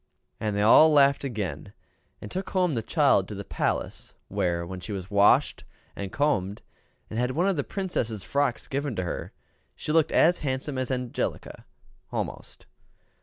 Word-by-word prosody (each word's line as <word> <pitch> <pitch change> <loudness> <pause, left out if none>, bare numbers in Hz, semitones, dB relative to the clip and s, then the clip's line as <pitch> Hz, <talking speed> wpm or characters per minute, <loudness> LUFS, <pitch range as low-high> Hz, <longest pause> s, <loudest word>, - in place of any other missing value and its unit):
And 105 -2 -2
they 105 - +1
all 155 +8 +7
laughed 140 -2 +4
again, 100 - -4 0.5
and 105 - -8
took 190 +1 -4
home 180 -4 +1
the 115 - -1
child - - +3
to - - -7
the - - -6
palace; - - -3
where, 85 -1 -1
when 90 +1 -7
she 90 - -7
was 95 -1 -6
washed 100 0 +4 0.3
and 100 -2 -5
combed, 105 -9 0 0.5
and 110 - -2
had 125 +1 +1
one 165 +9 +1
of 195 - +2
the 145 - -1
Princess' 120 - -3
frocks 140 -4 -1
given 140 -2 -2
to 95 - -2
her, 85 - -5 0.4
she - - -4
looked 160 0 +3
as 175 +1 +4
handsome 135 0 -3
as 130 - -2
Angelica, 125 -2 -3 0.5
almost. - - -5
125 Hz, 170 wpm, -26 LUFS, 100-145 Hz, 0.5 s, all